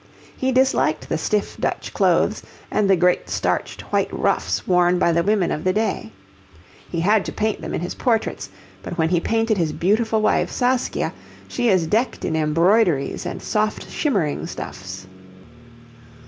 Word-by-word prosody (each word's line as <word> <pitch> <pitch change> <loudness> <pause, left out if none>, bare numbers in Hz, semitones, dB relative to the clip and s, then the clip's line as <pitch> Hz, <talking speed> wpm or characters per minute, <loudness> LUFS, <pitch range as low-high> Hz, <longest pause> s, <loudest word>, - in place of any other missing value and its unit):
He 260 0 0
disliked 255 - +2
the - - 0
stiff 210 +5 -1
Dutch - - -3
clothes - - +2 0.3
and 205 -2 +1
the 195 - +6
great 180 +1 +1
starched - - -1
white - - +1
ruffs - - 0
worn 180 0 +3
by 170 - +3
the 170 +1 +2
women 200 -1 +1
of 150 - -3
the 185 - +2
day. 205 - -1 0.8
He 170 - -2
had 205 +3 +3
to - - -4
paint 215 -1 -1
them - - -5
in - - -2
his 175 - -3
portraits; 230 -4 -1 0.3
but - - -7
when 160 -1 +2
he 175 -1 +2
painted 225 +2 0
his 160 -3 +1
beautiful 220 +4 +1
wife, 215 - +2
Saskia, 250 0 0 0.3
she 245 -2 0
is 185 -4 +3
decked 220 +10 0
in 160 - -1
embroideries 165 0 +2
and - - -6
soft 215 0 -1
shimmering 195 - -1
stuffs. 95 0 -7
190 Hz, 160 wpm, -22 LUFS, 165-220 Hz, 0.8 s, the